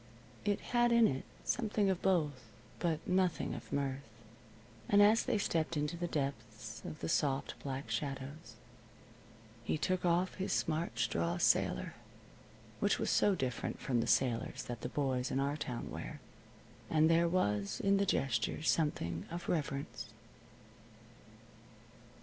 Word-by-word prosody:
It 205 Hz, -1 st, +1 dB
had 240 Hz, 0 st, +4 dB
in 235 Hz, -1 st, +6 dB
it 130 Hz, 0 st, -2 dB, 0.2 s
something 215 Hz, -4 st, +1 dB
of 185 Hz, -, -2 dB
both, 150 Hz, -10 st, +1 dB, 0.3 s
but 165 Hz, -2 st, -1 dB
nothing 185 Hz, -2 st, +1 dB
of -, -, -8 dB
mirth. 140 Hz, -1 st, -1 dB, 0.9 s
And 205 Hz, -, +5 dB
as 210 Hz, +3 st, +6 dB
they -, -, 0 dB
stepped 165 Hz, -4 st, 0 dB
into 150 Hz, +3 st, -1 dB
the 175 Hz, +1 st, -2 dB
depths 115 Hz, -7 st, -4 dB
of 155 Hz, -, -7 dB
the -, -, -2 dB
soft 140 Hz, -4 st, +1 dB
black 135 Hz, -3 st, -5 dB
shadows 140 Hz, +5 st, -4 dB, 1.1 s
he 140 Hz, -, 0 dB
took 185 Hz, +4 st, 0 dB
off 175 Hz, +1 st, +2 dB
his 190 Hz, -, -1 dB
smart 160 Hz, +1 st, -1 dB
straw 170 Hz, +1 st, 0 dB
sailor, 175 Hz, -, +2 dB, 0.9 s
which -, -, +2 dB
was -, -, 0 dB
so 205 Hz, -, +4 dB
different 130 Hz, -7 st, -3 dB
from 120 Hz, -3 st, 0 dB
the -, -, -2 dB
sailors 125 Hz, 0 st, +1 dB
that 120 Hz, -1 st, -6 dB
the 125 Hz, -, -3 dB
boys 130 Hz, -3 st, 0 dB
in 135 Hz, -, 0 dB
our 140 Hz, +1 st, 0 dB
town 125 Hz, -5 st, -4 dB
wear. -, -, -6 dB, 0.7 s
And 155 Hz, 0 st, +4 dB
there 165 Hz, +1 st, +4 dB
was 105 Hz, -, 0 dB
in 195 Hz, 0 st, +3 dB
the 200 Hz, -, +2 dB
gesture 130 Hz, 0 st, 0 dB
something 90 Hz, -, 0 dB
of 170 Hz, +1 st, -6 dB
reverence. 145 Hz, -2 st, -2 dB
150 Hz, 145 wpm, -34 LUFS, 130-175 Hz, 1.1 s, in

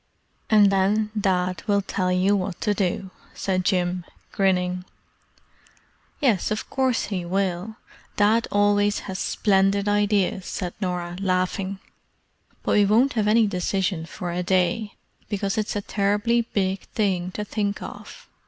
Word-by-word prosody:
"And 210 Hz, -2 st, +6 dB
then 205 Hz, +3 st, +2 dB
Dad 185 Hz, -3 st, 0 dB
will 200 Hz, -1 st, +2 dB
tell 185 Hz, -1 st, -1 dB
you 185 Hz, +3 st, +3 dB
what 190 Hz, -2 st, -3 dB
to 210 Hz, -, +1 dB
do," 190 Hz, -1 st, -2 dB, 0.2 s
said 185 Hz, -2 st, -1 dB
Jim, 180 Hz, -1 st, 0 dB, 0.3 s
grinning. 180 Hz, -2 st, +1 dB, 1.4 s
"Yes 240 Hz, -, +2 dB
of 215 Hz, -, -3 dB
course 260 Hz, -3 st, +1 dB
he 180 Hz, -2 st, -2 dB
will. 190 Hz, +3 st, -2 dB, 0.4 s
Dad 220 Hz, +3 st, +3 dB
always 205 Hz, 0 st, +2 dB
has 190 Hz, -1 st, -6 dB
splendid 200 Hz, 0 st, +2 dB
ideas," 205 Hz, -2 st, +1 dB
said 180 Hz, -2 st, -4 dB
Norah, 175 Hz, -2 st, -3 dB
laughing. 190 Hz, +1 st, -1 dB, 0.9 s
"But -, -, -1 dB
we 205 Hz, -1 st, +5 dB
won't 235 Hz, +7 st, +3 dB
have 215 Hz, -3 st, 0 dB
any 220 Hz, +1 st, +5 dB
decision 185 Hz, -3 st, -1 dB
for 175 Hz, 0 st, -5 dB
a 175 Hz, +1 st, -2 dB
day, 185 Hz, +4 st, 0 dB, 0.3 s
because 200 Hz, -1 st, -1 dB
it's 215 Hz, -1 st, -2 dB
a 205 Hz, -, -1 dB
terribly 210 Hz, +4 st, +1 dB
big 190 Hz, -1 st, 0 dB, 0.2 s
thing 185 Hz, -4 st, 0 dB
to 210 Hz, -, -4 dB
think 205 Hz, -1 st, -2 dB
of. -, -, -10 dB
195 Hz, 140 wpm, -24 LUFS, 185-210 Hz, 1.4 s, And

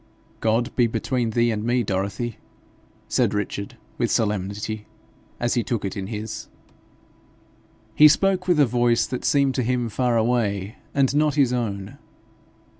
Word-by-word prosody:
'God 115 Hz, +3 st, 0 dB
be 120 Hz, -2 st, +4 dB
between 115 Hz, +1 st, -1 dB
thee 120 Hz, +1 st, +2 dB
and 105 Hz, -1 st, -2 dB
me, 120 Hz, +1 st, +1 dB
Dorothy!' 100 Hz, +4 st, -2 dB, 0.7 s
said -, -, +1 dB
Richard, 100 Hz, 0 st, -4 dB, 0.2 s
with -, -, +1 dB
solemnity, 105 Hz, 0 st, -2 dB, 0.5 s
as 120 Hz, 0 st, 0 dB
he 120 Hz, -, +1 dB
took 110 Hz, -1 st, -2 dB
it 95 Hz, -, -4 dB
in 95 Hz, -1 st, -4 dB
his. 110 Hz, 0 st, -5 dB, 1.5 s
He 150 Hz, -, +8 dB
spoke 185 Hz, +4 st, +2 dB
with 175 Hz, -4 st, +3 dB
a 145 Hz, -, +7 dB
voice 120 Hz, -1 st, +2 dB
that 125 Hz, -, -5 dB
seemed 140 Hz, -2 st, +3 dB
to 130 Hz, -, 0 dB
him 125 Hz, -1 st, 0 dB
far 120 Hz, +1 st, +1 dB
away 110 Hz, -3 st, 0 dB, 0.2 s
and 140 Hz, 0 st, +2 dB
not 150 Hz, -1 st, +2 dB
his 135 Hz, -4 st, +3 dB
own. 100 Hz, -5 st, -3 dB
120 Hz, 150 wpm, -23 LUFS, 105-125 Hz, 1.5 s, He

